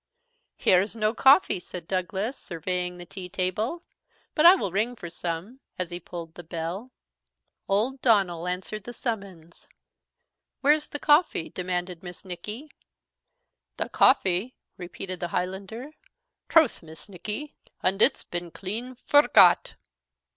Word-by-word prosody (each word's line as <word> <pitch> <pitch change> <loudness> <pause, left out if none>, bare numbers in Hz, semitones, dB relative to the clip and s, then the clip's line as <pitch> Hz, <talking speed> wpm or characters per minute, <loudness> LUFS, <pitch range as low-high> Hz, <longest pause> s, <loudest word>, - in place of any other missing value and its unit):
"Here's 190 +4 +3
no 215 -1 +1
coffee," 270 - +5
said 175 -1 -9
Douglas, 190 +6 -2
surveying 180 - -3
the 175 - -9
tea 180 +1 -8
table; 195 - -1 0.5
"but 310 +2 +6
I 360 - +10
will 200 - -2
ring 220 +6 0
for 170 -7 -8
some," 175 +9 -5 0.2
as 180 -1 -3
he 175 - -4
pulled 170 -2 -8
the 175 - -10
bell. 170 +8 -5 0.8
Old 235 +7 +1
Donald 185 -7 +2
answered 190 +3 -5
the 240 - -7
summons. 195 -9 -6 0.9
"Where's 295 +2 +3
the - - -5
coffee?" 295 - +3
demanded 180 -1 -3
Miss 180 +2 -10
Nicky. 210 - -7 1.1
"The - - -3
coffee!" 190 +7 +3 0.2
repeated 185 0 -6
the 175 - -2
Highlander; 195 - -4 0.6
"troth, 320 -6 +4
Miss 160 -1 -12
Nicky, 210 - -5 0.3
an' 195 +3 +1
it's - - +4
been 175 0 -5
clean 225 +9 -5
forgot." 225 -9 +5
190 Hz, 130 wpm, -26 LUFS, 175-235 Hz, 1.1 s, I